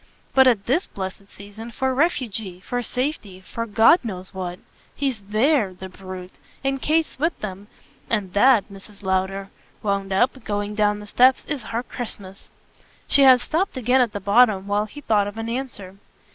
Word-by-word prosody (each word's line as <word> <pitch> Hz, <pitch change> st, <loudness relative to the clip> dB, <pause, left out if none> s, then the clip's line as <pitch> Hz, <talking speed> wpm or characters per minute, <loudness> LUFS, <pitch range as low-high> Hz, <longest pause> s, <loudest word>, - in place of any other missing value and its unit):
But, 265 Hz, -1 st, +6 dB
at 225 Hz, -6 st, +3 dB
THIS 300 Hz, +10 st, +1 dB
blessed 195 Hz, +1 st, -7 dB
season, 205 Hz, +3 st, -10 dB
for 260 Hz, +3 st, -1 dB
refuge, 225 Hz, -, -1 dB
for 245 Hz, 0 st, -2 dB
safety: 250 Hz, -7 st, -3 dB
for 230 Hz, +4 st, -5 dB
God 225 Hz, -, +6 dB
knows 190 Hz, -4 st, -6 dB
what. 180 Hz, -2 st, -5 dB, 0.4 s
He's 270 Hz, -5 st, -1 dB
THERE, 215 Hz, +1 st, +1 dB
the 190 Hz, +1 st, -8 dB
brute. 185 Hz, -1 st, -10 dB, 0.2 s
And 270 Hz, 0 st, -1 dB
Kate's 315 Hz, -2 st, 0 dB
with 325 Hz, +3 st, 0 dB
them. 200 Hz, -1 st, -6 dB, 0.4 s
And 200 Hz, -5 st, -1 dB
that," 235 Hz, 0 st, +5 dB
Mrs. 200 Hz, +1 st, -14 dB
Lowder 190 Hz, +1 st, -1 dB, 0.3 s
wound 200 Hz, -1 st, -1 dB
up, 245 Hz, +6 st, +1 dB
going 205 Hz, -1 st, -2 dB
down 210 Hz, 0 st, +1 dB
the -, -, -9 dB
steps, 255 Hz, +5 st, +4 dB
"is 290 Hz, -4 st, -3 dB
her 230 Hz, +2 st, -3 dB
Christmas." 200 Hz, -6 st, -9 dB, 0.6 s
She 280 Hz, -, +4 dB
had 260 Hz, -2 st, +7 dB
stopped 335 Hz, +1 st, -1 dB
again 255 Hz, +1 st, +3 dB
at 240 Hz, -4 st, +1 dB
the 205 Hz, -, -4 dB
bottom 200 Hz, 0 st, +4 dB
while 205 Hz, +1 st, 0 dB
he 290 Hz, +7 st, -11 dB
thought 210 Hz, -6 st, +2 dB
of 205 Hz, +2 st, -7 dB
an 225 Hz, 0 st, -4 dB
answer. 230 Hz, -6 st, -5 dB
215 Hz, 175 wpm, -23 LUFS, 195-255 Hz, 0.6 s, had